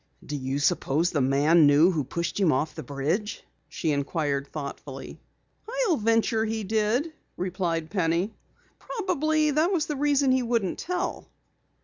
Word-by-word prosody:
"Do 150 - -4
you 135 0 -2
suppose 145 +3 +1
the 145 - 0
man 145 +4 +4
knew 150 +6 +5
who 155 -5 -1
pushed 170 +9 -3
him 185 -6 +4
off 150 +4 0
the - - -7
bridge?" 160 +10 -2 0.3
she 160 - -1
inquired 140 -1 -1
thoughtfully. 140 -2 -7 0.7
"I'll 360 -7 +3
venture 225 0 +2
he 220 0 -2
did," 220 - 0 0.2
replied 175 -3 -2
Penny. 180 +2 0 0.5
"Probably 310 - 0
that 310 +5 +2
was 335 -5 +1
the 300 - -3
reason 285 -1 +2
he 260 0 +3
wouldn't 230 -6 -1
tell." 360 +1 -3
185 Hz, 145 wpm, -26 LUFS, -, 0.7 s, knew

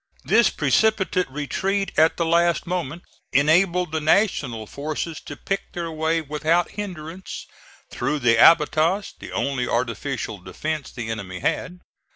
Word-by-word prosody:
This - - +4
precipitate 190 -6 +1
retreat 190 +8 -2
at 160 +1 +4
the 170 - +1
last 170 +1 +2
moment 175 -2 -3 0.3
enabled 175 +4 +3
the 160 0 -1
National 150 - +1
forces 155 +5 -4
to 145 - -9
pick 195 +5 -4
their 170 -1 -4
way 160 +1 0
without 155 +3 0
hinderance 185 -3 -7 0.5
through 150 - -1
the 120 -4 +3
abatis 165 - +4
the - - -9
only 135 -3 -1
artificial 120 -2 -2
defence 145 - -4
the 115 -3 -5
enemy 95 -5 -6
had. 180 0 -2
160 Hz, 135 wpm, -23 LUFS, 140-175 Hz, 0.5 s, This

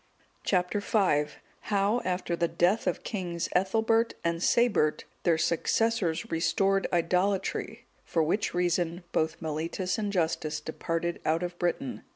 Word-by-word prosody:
(189) 185 +2 +1
Chap. 185 -9 +2
V. - - -15 0.4
How, 205 +3 +2
after 180 -1 -1
the 170 0 +1
death 185 +6 +1
of 180 - +2
the - - -19
kings 175 -5 -3
Ethelbert 225 +5 +2
and 170 0 0
Sabert, 205 -10 +3 0.2
their 170 -2 +3
successors 170 +1 0
restored 195 +4 +2
idolatry; 185 +3 0 0.2
for 165 - +1
which 185 +7 0
reason, 175 0 0
both 160 0 0
Mellitus 165 +5 -2
and 205 -2 -1
Justus 160 -4 0
departed 165 +2 -3
out 160 +3 +1
of 175 0 -4
Britain. 170 -6 -2
175 Hz, 140 wpm, -28 LUFS, 165-200 Hz, 0.4 s, Sabert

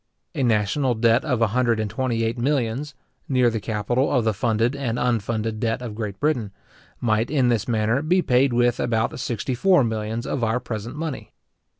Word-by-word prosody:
A - - -3
national 120 +3 +1
debt 115 +2 +3
of 145 - -1
about - - +6
a - - 0
hundred 120 0 +1
and 110 - -1
twenty 120 -1 -1
eight 115 +1 0
millions, 135 +2 -1 0.3
near 125 -3 +3
the 110 - -2
capital 110 +5 -1
of 125 -4 +2
the 110 - +2
funded 115 +3 0
and 125 -4 -2
unfunded 115 -2 -1
debt 115 +2 -1
of 115 -3 -5
Great 105 -3 -5
Britain, 125 -8 0 0.5
might, 110 0 +1
in 135 -4 +2
this 115 -4 0
manner, 115 +2 +1
be 175 +4 +2
paid 130 +2 +3
with 120 0 +2
about 115 0 0
sixty 120 +1 -2
four 180 +4 +4
millions 110 +1 -3
of 130 - -2
our 115 +2 +1
present 115 0 -6
money. 155 -2 -5
120 Hz, 195 wpm, -23 LUFS, 110-130 Hz, 0.5 s, about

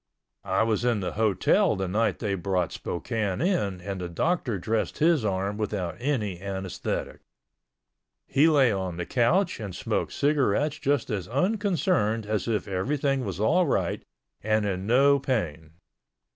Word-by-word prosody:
I - - +3
was 110 0 0
in 120 -3 +2
the 95 - -3
hotel 105 -4 +2
the 95 0 -2
night 110 +5 +1
they 105 -4 -2
brought 90 -1 -1
Spokane 100 +1 -3
in 105 - 0
and 95 0 -5
the 90 - -4
doctor 130 - 0
dressed 110 +4 -2
his 160 -4 +3
arm 100 +1 -1
without 100 -5 -2
any 110 -9 -2
anesthetic. 95 -2 -4 1.1
He 145 +4 +3
lay 140 -6 +4
on 95 -4 -3
the 90 - -3
couch 170 +10 +1
and 100 -5 -6
smoked - - -2
cigarettes 145 0 +1
just 140 -2 0
as 95 -4 -3
unconcerned 180 - +1
as 105 +1 -2
if 110 -3 -1
everything 135 +8 0
was 95 -4 -4
all 170 - +3
right - - -1 0.4
and 110 0 +1
in 95 -1 -2
no 140 +4 +5
pain. 85 - -3
110 Hz, 150 wpm, -26 LUFS, 95-140 Hz, 1.1 s, no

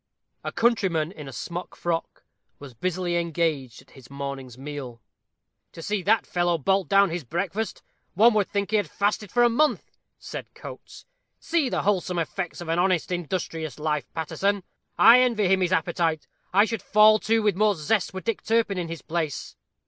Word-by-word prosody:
A - - -3
countryman, 190 -9 +1
in 150 -7 -10
a - - -7
smock 175 +6 -6
frock, 170 -1 -3 0.3
was 140 -3 -11
busily 180 +5 -2
engaged 160 -8 -2
at 130 - -26
his 130 -3 -16
morning's 140 -3 -6
meal. 135 -4 -7 0.7
"To 165 - -9
see 205 +1 -1
that 210 +4 +2
fellow 175 -1 0
bolt 190 +5 +1
down 200 -2 +4
his 170 -1 -3
breakfast, 185 - -3 0.3
one 225 +5 +6
would 210 -3 +1
think 200 0 -2
he 215 - +4
had 200 -7 -1
fasted 205 +1 -1
for 240 0 +3
a - - +7
month," 295 +6 0 0.2
said - - -8
Coates; - - -11 0.3
"see 325 -5 0
the - - -1
wholesome 185 -3 0
effects 175 +1 -3
of 175 - -7
an 165 +1 0
honest, 185 -1 +1
industrious 165 -4 -3
life, 150 -3 -2
Paterson. 195 +5 -1 0.3
I 235 +2 +8
envy 235 -6 +2
him 190 +1 +3
his 180 -1 +1
appetite 165 -2 0 0.3
I 200 +3 +5
should 225 -2 -4
fall 215 0 +5
to 225 +1 +1
with 210 -3 +2
more 210 +1 +3
zest 180 +5 0
were 190 - -6
Dick 230 +1 -2
Turpin 220 -4 +1
in 175 - -3
his 165 -1 -7
place." 160 -4 -3
180 Hz, 180 wpm, -25 LUFS, 160-210 Hz, 0.7 s, I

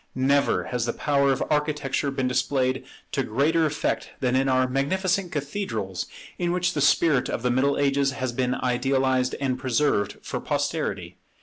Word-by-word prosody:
Never 140 +2 +2
has 125 -2 -2
the 120 - 0
power 140 -2 +2
of 135 - 0
Architecture 150 -2 0
been 135 -2 -1
displayed 130 +1 0 0.3
to 135 - 0
greater 150 +7 +2
effect 150 - -2
than 125 -1 +1
in 135 +1 +2
our 130 0 +3
magnificent 180 +8 0
cathedrals, 140 - -3 0.3
in 175 -1 0
which 180 0 0
the 145 - -1
spirit 145 -2 +3
of 115 - -3
the 125 - +2
Middle 135 +3 +2
Ages 140 -1 +2
has 130 -3 -2
been 125 +1 0
idealized 130 0 +1
and 130 -2 -1
preserved 130 -6 +1
for - - -4
posterity. 140 - -2
135 Hz, 165 wpm, -25 LUFS, 125-145 Hz, 0.3 s, our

